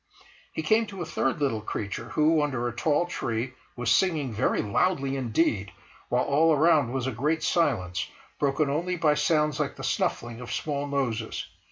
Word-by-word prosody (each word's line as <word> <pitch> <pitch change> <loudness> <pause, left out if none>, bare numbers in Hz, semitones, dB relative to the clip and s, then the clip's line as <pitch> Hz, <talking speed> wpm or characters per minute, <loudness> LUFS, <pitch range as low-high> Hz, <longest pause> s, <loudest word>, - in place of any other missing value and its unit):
He 160 - -4
came 220 +7 +3
to 195 -3 -6
a - - -5
third 135 -4 -1
little 130 -7 0
creature 100 -2 -4
who, 155 +1 +3
under 130 -5 -1
a 120 - -5
tall 150 +6 +2
tree, 120 -7 -3 0.2
was 120 -1 0
singing 150 -4 +2
very 105 - +1
loudly 135 - +1
indeed, 115 - 0 0.4
while 125 +1 +2
all 155 +4 +3
around 150 -5 +4
was 130 -1 -2
a 130 - -1
great 150 +7 0
silence, 95 - +1 0.3
broken 145 +1 +1
only 170 +6 -1
by 160 -3 +3
sounds 150 0 +1
like 145 -2 -1
the - - -9
snuffling 120 0 -1
of 125 - -7
small 145 -2 -2
noses. 125 -6 -2
140 Hz, 175 wpm, -27 LUFS, 120-160 Hz, 0.4 s, around